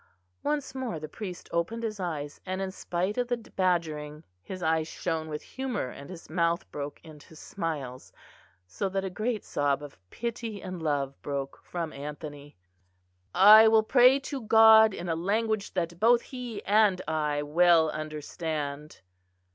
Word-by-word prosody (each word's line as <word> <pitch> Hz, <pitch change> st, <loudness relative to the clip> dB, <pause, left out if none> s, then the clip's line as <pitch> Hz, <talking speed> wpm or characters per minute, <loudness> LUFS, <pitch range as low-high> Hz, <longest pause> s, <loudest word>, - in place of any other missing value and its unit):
Once 295 Hz, -1 st, -2 dB
more 255 Hz, -11 st, -4 dB
the 155 Hz, -, -6 dB
priest 180 Hz, +2 st, -8 dB
opened 220 Hz, +8 st, -2 dB
his 215 Hz, -2 st, -3 dB
eyes; 155 Hz, -5 st, -4 dB
and, 185 Hz, 0 st, -4 dB
in 190 Hz, -1 st, -3 dB
spite 185 Hz, +4 st, -2 dB
of 245 Hz, -, 0 dB
the 245 Hz, 0 st, 0 dB
badgering, 165 Hz, -8 st, -2 dB, 0.2 s
his 185 Hz, -, -7 dB
eyes 160 Hz, 0 st, +1 dB
shone 160 Hz, -2 st, -3 dB
with 150 Hz, 0 st, -5 dB
humour 260 Hz, -, -4 dB
and 140 Hz, +2 st, -11 dB
his 175 Hz, -2 st, -10 dB
mouth 170 Hz, +1 st, 0 dB
broke 145 Hz, 0 st, -6 dB
into 155 Hz, 0 st, -14 dB
smiles, 155 Hz, -7 st, -5 dB, 0.5 s
so 105 Hz, -, -3 dB
that 195 Hz, 0 st, -2 dB
a 190 Hz, -, -4 dB
great 215 Hz, +3 st, -2 dB
sob 145 Hz, 0 st, 0 dB
of 140 Hz, -9 st, -11 dB
pity 230 Hz, -, -5 dB
and 185 Hz, -2 st, -7 dB
love 140 Hz, -3 st, -2 dB
broke 140 Hz, -1 st, -4 dB
from 170 Hz, -3 st, -5 dB
Anthony. 145 Hz, -, -8 dB, 0.8 s
"I 215 Hz, +3 st, +9 dB
will 220 Hz, 0 st, +5 dB
pray 250 Hz, +3 st, +6 dB
to 275 Hz, -1 st, -5 dB
God 220 Hz, -1 st, +7 dB
in 175 Hz, -, -6 dB
a 165 Hz, -, 0 dB
language 210 Hz, +4 st, -1 dB
that 170 Hz, -1 st, -2 dB
both 235 Hz, +3 st, +4 dB
He 250 Hz, -4 st, -7 dB
and 205 Hz, -2 st, +4 dB
I 150 Hz, -2 st, 0 dB
well 165 Hz, +1 st, +4 dB
understand." 150 Hz, -, -5 dB
175 Hz, 155 wpm, -28 LUFS, 150-215 Hz, 0.8 s, I